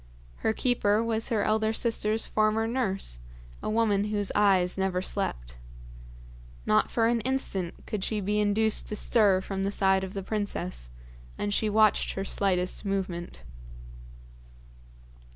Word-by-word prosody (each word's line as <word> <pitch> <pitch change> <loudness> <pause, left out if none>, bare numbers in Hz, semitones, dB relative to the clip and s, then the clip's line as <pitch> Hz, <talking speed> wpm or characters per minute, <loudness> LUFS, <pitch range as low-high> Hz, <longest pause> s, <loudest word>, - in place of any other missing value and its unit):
Her - - 0
keeper 220 -2 +1
was 225 0 -1
her 220 -4 +1
elder 220 0 +1
sister's 225 -1 0
former 215 +1 +1
nurse, 200 - -1 0.4
a - - -3
woman 215 -2 +2
whose 205 -2 -1
eyes 190 -3 +3
never 190 -1 0
slept. - - -3 1.1
Not 105 - +3
for 230 - +1
an 230 0 +2
instant 210 -9 -2
could 210 -3 -4
she 215 +1 -1
be 205 +1 0
induced 210 +1 +1
to 210 - -2
stir 205 -4 +3
from 195 0 -4
the 200 - -1
side 190 -1 +2
of 190 +1 -6
the 195 - -3
princess, 140 - -3 0.5
and 205 0 -2
she 215 +1 +1
watched 215 0 +3
her 195 - -4
slightest 185 -2 0
movement. 190 -4 -4
205 Hz, 140 wpm, -27 LUFS, 190-220 Hz, 1.1 s, eyes